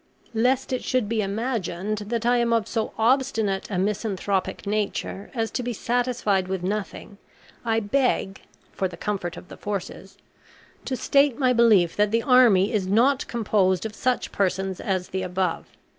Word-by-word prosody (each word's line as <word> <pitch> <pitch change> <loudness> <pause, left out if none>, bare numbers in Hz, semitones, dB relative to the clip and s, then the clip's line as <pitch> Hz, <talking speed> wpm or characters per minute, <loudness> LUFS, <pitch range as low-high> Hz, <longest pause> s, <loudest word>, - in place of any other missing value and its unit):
Lest 255 +4 +1
it 255 - -2
should 255 -5 0
be 225 0 0
imagined 210 -2 -2
that 230 +1 -2
I 245 +1 +4
am 235 -1 +2
of 225 -2 +1
so 225 -2 -2
obstinate 225 -5 +1
a 195 - -2
misanthropic 200 0 -1
nature 205 -1 -2
as 225 -2 -1
to - - -2
be 245 0 -3
satisfied 230 -5 0
with 190 -1 -3
nothing, 205 +1 -4 0.4
I 225 -1 +1
beg 205 -3 0 0.3
(for 190 - -1
the 180 - -11
comfort 190 -4 -3
of - - -11
the - - -11
forces) 195 -1 -6 0.7
to 260 - -2
state 275 -1 +3
my 255 -3 +3
belief 215 -8 +4
that 210 0 +3
the 230 +2 +1
army 235 -7 +5
is 200 -4 0
not 245 +7 +3
composed 205 -5 +1
of 220 - -4
such 250 +3 -1
persons 190 -1 -1
as 185 -2 -2
the 190 - -3
above. 185 -1 -2
215 Hz, 165 wpm, -24 LUFS, 190-240 Hz, 0.7 s, army